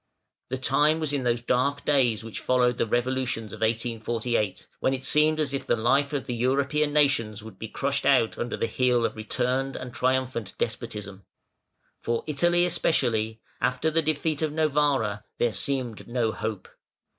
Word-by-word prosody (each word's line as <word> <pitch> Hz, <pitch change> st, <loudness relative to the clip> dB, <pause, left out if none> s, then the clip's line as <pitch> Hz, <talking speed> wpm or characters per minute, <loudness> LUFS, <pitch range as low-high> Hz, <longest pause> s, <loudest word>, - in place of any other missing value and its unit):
The 130 Hz, -, -2 dB
time 145 Hz, +4 st, +2 dB
was 155 Hz, -2 st, -1 dB
in 135 Hz, -3 st, -1 dB
those 120 Hz, -1 st, +1 dB
dark 130 Hz, +4 st, 0 dB
days 125 Hz, -7 st, +2 dB
which 115 Hz, -1 st, -6 dB
followed 125 Hz, -1 st, +2 dB
the -, -, +1 dB
revolutions 120 Hz, -2 st, -1 dB
of -, -, -9 dB
1848, 115 Hz, -1 st, -1 dB
when 135 Hz, -, +1 dB
it 130 Hz, -, -8 dB
seemed 155 Hz, +2 st, +3 dB
as 145 Hz, -3 st, +1 dB
if 140 Hz, -, -3 dB
the -, -, +3 dB
life 135 Hz, +6 st, +2 dB
of 140 Hz, -5 st, -2 dB
the 125 Hz, -, -3 dB
European 140 Hz, +5 st, +1 dB
nations 115 Hz, -8 st, +2 dB
would 105 Hz, -4 st, -11 dB
be 110 Hz, -, -5 dB
crushed 140 Hz, +5 st, -1 dB
out 130 Hz, -5 st, +3 dB
under 120 Hz, -, -3 dB
the -, -, 0 dB
heel 120 Hz, +1 st, +2 dB
of -, -, -2 dB
returned 125 Hz, +5 st, -1 dB
and 125 Hz, -2 st, -6 dB
triumphant 130 Hz, -4 st, -1 dB
despotism. 100 Hz, -2 st, -4 dB, 0.7 s
For 115 Hz, 0 st, -1 dB
Italy 175 Hz, +4 st, +2 dB
especially, 110 Hz, -10 st, 0 dB, 0.2 s
after 125 Hz, +6 st, +1 dB
the 165 Hz, +1 st, +2 dB
defeat 155 Hz, 0 st, -1 dB
of 155 Hz, -2 st, 0 dB
Novara, 145 Hz, -9 st, +1 dB
there 120 Hz, -2 st, +1 dB
seemed 130 Hz, -5 st, -2 dB
no 120 Hz, -2 st, 0 dB
hope. 110 Hz, -3 st, -4 dB
125 Hz, 170 wpm, -26 LUFS, 115-140 Hz, 0.7 s, seemed